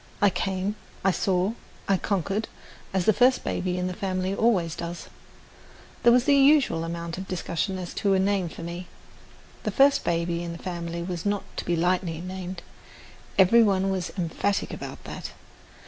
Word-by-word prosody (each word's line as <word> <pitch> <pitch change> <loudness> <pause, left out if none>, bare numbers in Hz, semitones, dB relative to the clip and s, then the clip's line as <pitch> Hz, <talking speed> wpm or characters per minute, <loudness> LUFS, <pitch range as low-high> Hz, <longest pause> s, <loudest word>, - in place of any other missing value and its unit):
I 205 -1 +5
came, 190 +3 -2 0.3
I 195 - +4
saw, 185 +2 +1 0.3
I 195 - +4
conquered, 195 +2 -1 0.4
as 190 -2 0
the 220 - +5
first 255 +5 +4
baby 180 0 -1
in 180 - -1
the 185 - -2
family 185 -1 -2
always 195 -7 +2
does. 170 0 -6 0.9
There 235 - +6
was 245 0 +5
the 285 - +4
usual 275 - +5
amount 170 +1 -4
of 190 - -6
discussion 185 +1 -2
as 180 -2 -6
to 200 -1 +3
a - - +3
name 190 -2 +1
for 165 - -9
me. 175 +2 -6 0.7
The - - -2
first 280 +1 +4
baby 170 0 0
in 170 -1 -4
the 170 - -10
family 170 -2 -4
was 175 -1 -4
not 205 -1 0
to - - -3
be 175 - +1
lightly 175 -1 0
named, 185 0 -6 0.7
every 195 +5 +7
one 195 -3 +3
was 185 -2 -2
emphatic 185 +3 -1
about - - -7
that. - - -7
185 Hz, 175 wpm, -26 LUFS, 170-200 Hz, 0.9 s, every